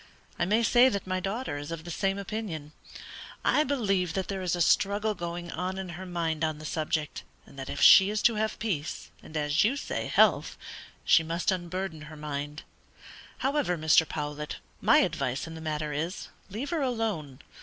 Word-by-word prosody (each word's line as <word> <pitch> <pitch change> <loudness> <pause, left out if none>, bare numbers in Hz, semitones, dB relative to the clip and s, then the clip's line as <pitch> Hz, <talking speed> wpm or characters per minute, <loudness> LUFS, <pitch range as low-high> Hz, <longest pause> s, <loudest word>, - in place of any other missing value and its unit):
I - - +2
may 215 +5 +2
say 245 +2 +6
that 200 -5 -3
my 185 0 -1
daughter 195 - -3
is 145 +2 -7
of 165 -1 -5
the 175 - -7
same 195 +3 0
opinion. 195 -7 -5 0.7
I 300 - +4
believe 195 - 0
that 190 -1 -2
there 195 -1 -3
is 180 -1 0
a - - -4
struggle 205 +5 +3
going 175 -2 -5
on 185 +1 -3
in 190 -1 -5
her 180 +2 -7
mind 165 -3 -2
on 155 -1 0
the 155 - -10
subject, 155 -1 -2 0.2
and - - -17
that 135 - -6
if - - -4
she 195 0 +9
is 210 0 -1
to 235 - +5
have 220 0 -1
peace, 185 -9 -3
and 155 - -7
as 150 +1 +2
you 245 +7 +2
say - - -3
health, - - +3 0.5
she - - +6
must 165 +4 -1
unburden 185 -2 -3
her 155 - -10
mind. 150 0 -5 0.8
However, 270 -10 +1
Mr. 155 0 +4
Powlett, 150 -1 -4 0.3
my - - +6
advice 130 +1 0
in 165 - -8
the 160 - -8
matter 155 -1 -2
is, 165 +6 -3 0.2
leave 230 - -5
her 330 -3 0
alone. 220 - -2
175 Hz, 190 wpm, -28 LUFS, 155-205 Hz, 0.8 s, she